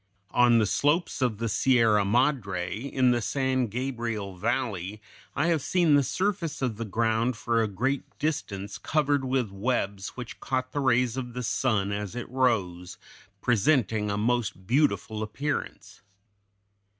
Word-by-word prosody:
On 120 -1 +5
the 110 - +3
slopes 150 - +1
of 120 -5 +1
the 115 +2 -2
Sierra 115 -2 +3
Madre, 100 -6 +1
in 130 +2 +1
the 120 -1 +1
San 130 0 0
Gabriel 115 -4 -3
Valley, 105 -1 -2 0.4
I - - +1
have 165 -3 +2
seen 170 0 +2
the 145 - +6
surface 175 0 -1
of 120 -5 -1
the 115 - -4
ground 115 +3 0
for 115 0 +1
a 110 - +1
great 130 +8 -2
distance 100 -11 -3
covered 145 -3 +1
with 130 -5 0
webs 100 -1 -2
which 125 -2 -7
caught 130 -1 -2
the 145 - -2
rays 125 -2 +2
of 125 -2 -4
the 125 - -3
sun 110 -5 0
as 100 +1 -4
it 120 - -5
rose, 95 -9 0 0.5
presenting 115 -3 +2
a 100 - -1
most 110 -3 -1
beautiful 120 -3 +1
appearance. 140 +7 -4
120 Hz, 150 wpm, -27 LUFS, 105-130 Hz, 0.5 s, the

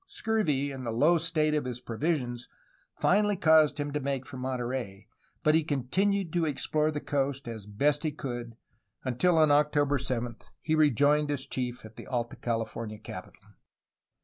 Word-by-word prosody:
Scurvy 150 -11 0
and 135 -1 -7
the 120 - -3
low 150 +10 +3
state 155 -2 +1
of 150 -3 0
his 125 -1 -3
provisions, 120 -1 -2 0.5
finally 205 +2 +3
caused 155 -2 +5
him 145 0 -2
to 150 - 0
make 135 -1 -2
for - - -9
Monterey, 125 -6 -4 0.4
but 155 - +4
he 160 0 +4
continued 170 +7 0
to 175 -1 +1
explore 155 +1 0
the 150 -1 -2
coast 140 -2 -2
as 110 -3 -7
best 140 +8 +1
he 155 - -1
could, 120 -5 -6 0.5
until 150 +7 +2
on 155 -2 +5
October 145 -1 +3
7 120 -2 -2 0.2
he 155 - -1
rejoined 150 0 +3
his 145 -2 -2
chief 125 -3 -4
at 110 0 -13
the - - -9
Alta 120 -2 -2
California 115 -2 -3
capital. 105 - -9
140 Hz, 165 wpm, -29 LUFS, 120-155 Hz, 0.5 s, caused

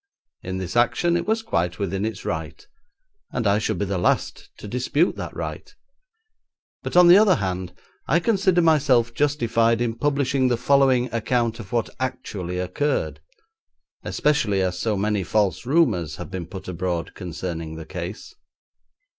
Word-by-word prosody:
In 95 0 -4
this 95 +1 -5
action 170 +8 +2
it 175 +1 -1
was 225 +1 0
quite 90 - -1
within 100 0 -2
its 110 - -5
right, - - -4 0.7
and 125 -2 -2
I 100 +1 +3
should 110 -2 -1
be 100 - -1
the 95 -1 -2
last - - 0
to - - -9
dispute 130 - +1
that - - -6
right; - - -6 1.1
but, - - -2
on 180 -1 +8
the 180 +3 +9
other 205 -4 +5
hand, 90 - -3 0.3
I 165 - +3
consider 190 -2 +2
myself 135 -7 +3
justified 115 -5 +1
in 120 -1 0
publishing 140 0 +1
the 120 -2 +1
following 130 -2 +3
account 115 0 0
of 100 -4 -9
what 115 -2 -1
actually 105 -9 -4
occurred, 90 +12 -1 0.8
especially 115 -11 +1
as 90 0 -2
so 105 +1 0
many 105 0 0
false 100 +1 0
rumours 110 - +2
have - - -8
been 90 -3 -5
put 95 +1 -9
abroad 90 -1 -3
concerning 85 -3 -5
the 80 0 -8
case. 90 - -7
115 Hz, 155 wpm, -23 LUFS, 95-140 Hz, 1.1 s, the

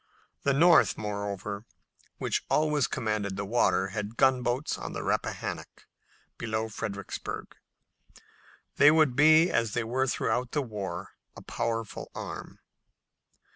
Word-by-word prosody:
The 140 - +2
North, 170 +5 +5
moreover, 100 -1 -4 0.5
which - - -1
always 150 -3 +2
commanded 105 -3 -2
the 100 - -3
water, 100 -3 +2
had 105 +3 -5
gunboats 130 +1 +2
in - - -6
the - - -4
Rappahannock - - -3 0.5
below 110 -1 -2
Fredericksburg, 105 -2 -6 0.6
and - - -18 0.6
they 145 - +8
would 155 -5 +4
be, 155 +4 +6
as 115 -3 0
they 120 - +1
were 130 +4 0
throughout 120 0 -1
the 145 - +1
war, 105 -5 -5 0.2
a - - -11
powerful 115 -2 -3
arm. - - -7
115 Hz, 125 wpm, -28 LUFS, 105-135 Hz, 0.6 s, they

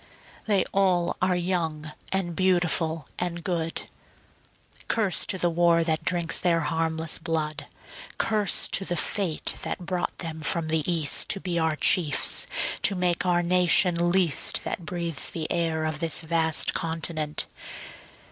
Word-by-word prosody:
They 205 -3 +2
all 185 -3 +1
are 185 0 +2
young 165 -4 -2 0.2
and 185 -3 -2
beautiful 175 -4 +1
and 170 -1 -4
good; 165 -2 -2 1.0
Curse 210 -5 +1
to 190 - +2
the 175 -1 +1
war 170 0 +3
that 160 -1 -1
drinks 175 -2 0
their 170 -2 +1
harmless 160 +1 -2
blood. 160 -2 -3 0.5
Curse 210 -2 +1
to - - +2
the 175 -2 -3
fate 185 -7 -1
that 180 - -3
brought 180 0 -3
them 160 -2 -6
from 160 +1 0
the 160 +1 0
East 160 -4 +2
To 195 - +1
be 175 -3 -2
our 160 -1 0
chiefs 150 -2 +3 0.3
to 195 - +2
make 180 0 0
our 175 -1 +2
nation 175 0 +3
least 175 -6 +3
That 170 - -5
breathes 170 -4 -1
the 160 -2 -5
air 165 -2 -1
of 155 -1 -3
this 165 0 +2
vast 160 -1 +1
continent. 160 -2 -2
170 Hz, 145 wpm, -25 LUFS, 160-180 Hz, 1.0 s, war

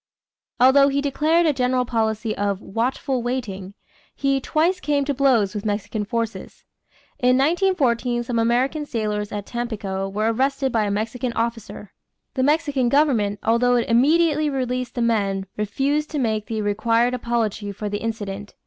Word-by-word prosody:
Although 265 +3 +6
he 280 0 0
declared 305 +4 +2
a 310 - +3
general 250 -1 +1
policy 220 -2 -1
of 200 -1 -1
"watchful 245 +5 -2
waiting," 205 -6 -4 0.4
he 275 -1 0
twice 335 +7 +1
came 290 -4 0
to 285 - 0
blows 250 -8 +2
with 205 - -4
Mexican 210 0 -2
forces. 230 0 -4 0.6
In 250 -1 +3
1914 270 -7 +1
some 235 -1 -2
American 255 +6 +1
sailors 210 -4 -2
at 205 -1 -4
Tampico 205 -5 -4
were 215 +3 0
arrested 270 +2 0
by 220 -2 +1
a - - -1
Mexican 230 +4 -2
officer; 230 -3 -4 0.4
the 260 - -1
Mexican 290 -3 +1
government, 240 -8 +2
although 245 +2 +3
it 240 - +1
immediately 300 +5 +3
released 255 -2 -3
the 240 - 0
men, 200 -4 0
refused 275 +9 -1
to 305 - -4
make 220 -5 -1
the 220 -2 -2
required 230 +4 +1
apology 225 -4 -2
for 210 +2 -5
the 205 0 -3
incident. 205 -3 -5
240 Hz, 155 wpm, -22 LUFS, 215-275 Hz, 0.6 s, Although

